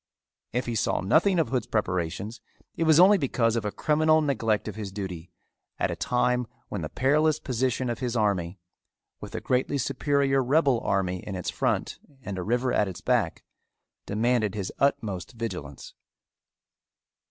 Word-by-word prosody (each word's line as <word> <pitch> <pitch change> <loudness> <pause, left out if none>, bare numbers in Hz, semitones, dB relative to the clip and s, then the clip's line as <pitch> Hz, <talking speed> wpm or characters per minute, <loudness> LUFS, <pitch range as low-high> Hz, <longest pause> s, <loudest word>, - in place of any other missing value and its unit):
If 125 +2 -1
he 120 - -3
saw 110 - 0
nothing 170 - +3
of 165 - +1
Hood's 125 -4 -1
preparations, 100 +1 -2 0.3
it 165 - 0
was 160 0 +6
only 195 +2 +7
because 120 -5 +1
of 115 -3 -1
a 105 - -1
criminal 155 +3 +3
neglect 115 -9 0
of 105 - -4
his 105 -3 -5
duty 95 -4 -6 0.5
at - - 0
a - - -3
time 125 0 +1 0.2
when 100 - -4
the 75 - -4
perilous 150 +4 +2
position 130 0 -1
of 120 -1 -3
his 125 -2 -2
army, 100 -5 0 0.6
with - - -9
a - - -3
greatly 130 +2 0
superior 135 +1 +1
rebel 135 -1 +3
army 95 -5 0
in 95 +1 -6
its 90 - -3
front - - -1 0.2
and 95 -2 -5
a - - -3
river 120 +4 0
at 105 - +2
its 95 - -7
back, - - 0 0.6
demanded 110 -1 +1
his 100 -3 -4
utmost 110 -8 0
vigilance. 115 - -6
120 Hz, 165 wpm, -27 LUFS, 100-140 Hz, 0.6 s, only